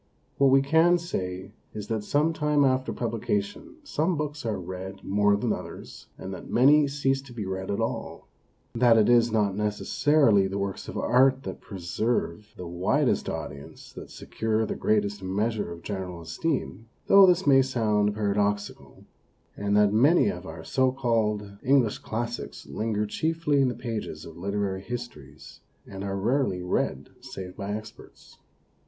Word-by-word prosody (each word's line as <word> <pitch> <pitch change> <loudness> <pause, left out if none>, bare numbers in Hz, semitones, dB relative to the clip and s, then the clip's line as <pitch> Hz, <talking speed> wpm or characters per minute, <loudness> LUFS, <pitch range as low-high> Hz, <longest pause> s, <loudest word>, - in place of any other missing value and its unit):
What 140 -1 +5
we 135 +1 +5
can 160 +5 +4
say 95 - -5 0.2
is 105 -1 -6
that 110 -2 -1
some 150 +8 +1
time 150 -2 +2
after 130 0 +1
publication 200 - -3
some 170 - -1
books 150 -4 -4
are 110 - -2
read 95 +2 -7
more 105 +1 +2
than 100 - 0
others - - -9
and 95 - -7
that 90 - -9
many 145 +4 +5
cease 135 -1 0
to 135 -2 -15
be 110 -4 -5
read 95 0 -4
at 100 - -1
all; - - -4 0.5
that 115 -1 +5
it 110 - +4
is 120 -1 +4
not 105 -3 +1
necessarily, 105 +1 +2
the 95 +1 -4
works 100 -1 -4
of - - -6
art 130 +2 +3
that - - -7
preserve 105 +1 -3
the 90 - -7
widest 85 +2 0
audience 70 0 -8
that - - -10
secure 110 0 -2
the - - -3
greatest 105 -1 0
measure 105 +1 -2
of 85 0 -9
general 95 -4 -5
esteem, 115 - -3 0.2
though 195 -1 +8
this 180 +1 +3
may 135 -2 +6
sound 105 -5 +1
para 105 -2 0
doxical; 105 0 -2 0.5
and 100 0 0
that 105 -1 +4
many 150 - +4
of 205 - -6
our 80 0 -8
so 130 +8 +1
called 115 -5 0
English 130 -5 +2
classics 120 +2 -5
linger 105 -1 -2
chiefly 155 +4 0
in 135 - +3
the 125 - -2
pages 110 -9 -5
of 80 - -11
literary 100 +1 -2
histories, 100 - -9 0.2
and 95 -1 -8
are 100 -1 -3
rarely 110 -3 0
read 90 - -2
save 90 -1 -8
by 100 0 -5
experts. 110 +1 -10
110 Hz, 160 wpm, -26 LUFS, 100-135 Hz, 0.5 s, though